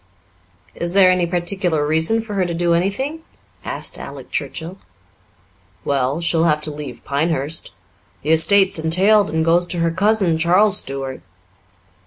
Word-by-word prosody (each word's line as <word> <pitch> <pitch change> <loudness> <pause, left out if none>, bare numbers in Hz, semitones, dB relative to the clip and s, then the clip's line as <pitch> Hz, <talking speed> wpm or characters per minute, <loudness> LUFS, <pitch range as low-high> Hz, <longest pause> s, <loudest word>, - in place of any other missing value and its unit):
"Is 170 +1 -3
there 190 -2 +7
any 180 -1 +1
particular 175 -3 -1
reason 160 +9 +1
for 215 -2 -8
her 195 -2 +1
to 170 - -4
do 170 0 +1
anything?" 230 - -1 0.4
asked - - -4
Alec - - -10
Churchill. 170 +4 -5 1.1
"Well, 140 +3 0
she'll 165 -1 +1
have 150 -2 +2
to 150 0 -5
leave 145 -5 -8
Pinehurst. 150 +1 -1 0.5
The 150 - 0
estate's 190 +3 +3
entailed 190 +6 +3
and 160 0 -1
goes 175 +1 +3
to 175 - -3
her 165 0 +1
cousin, 190 -2 +1
Charles 190 +5 +3
Stuart." 135 -1 -5
170 Hz, 145 wpm, -19 LUFS, 160-190 Hz, 1.1 s, there